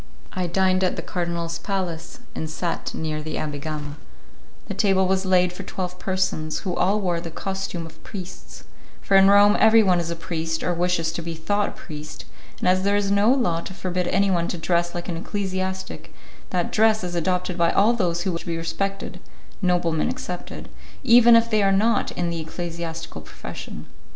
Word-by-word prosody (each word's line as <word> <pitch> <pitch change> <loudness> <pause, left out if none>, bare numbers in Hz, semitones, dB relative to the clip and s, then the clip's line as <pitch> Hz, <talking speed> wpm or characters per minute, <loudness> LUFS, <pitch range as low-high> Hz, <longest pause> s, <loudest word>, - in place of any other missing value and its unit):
I 185 -1 -1
dined 185 +1 +2
at 185 - +1
the - - -5
cardinal's 170 -1 -3
palace 175 -4 -4
and 160 - -4
sat 170 +2 -3
near 155 -1 -3
the 155 +1 -5
Abbé 150 -2 -3
Gama; 150 -1 -5 0.7
the - - -3
table 190 -3 +3
was 190 0 +1
laid 180 -1 +3
for 190 - -7
twelve 180 -1 -5
persons, 185 -5 -1
who 180 -3 -2
all 200 +3 +2
wore 175 -4 -1
the 170 - -6
costume 190 0 -4
of 165 - -14
priests, 185 -3 -9 0.4
for 195 - +1
in 195 0 +7
Rome 205 +1 +7
everyone 220 -5 +6
is 170 -1 -3
a 170 - -2
priest 165 -1 -3
or 180 - +1
wishes 170 -2 0
to 170 - -4
be 165 0 -5
thought 205 +6 0
a - - -8
priest 155 -2 -9 0.3
and - - -2
as 185 +1 +4
there 200 +1 +2
is 200 -1 +1
no 200 +4 +4
law 180 -11 +1
to 190 - -8
forbid 180 -1 -2
anyone 190 -3 +2
to - - -3
dress 170 +1 0
like 175 - -4
an 170 -3 -3
ecclesiastic 190 0 -4 0.4
that 180 -2 -1
dress 220 -1 +3
is 175 -1 -3
adopted 180 +1 0
by 170 -1 +3
all 215 +4 +4
those 175 -6 0
who 190 - 0
wish 170 - -3
to - - -13
be 165 -1 -1
respected 195 +4 -3 0.4
(noblemen 175 -4 +1
excepted) 180 -1 -6 0.4
even 235 -1 +7
if 230 0 +5
they 215 -1 +3
are 195 - +4
not 210 +3 +2
in 175 -1 -1
the 165 - -3
ecclesiastical 165 - -5
profession. 80 - -8
180 Hz, 190 wpm, -24 LUFS, 170-195 Hz, 0.7 s, in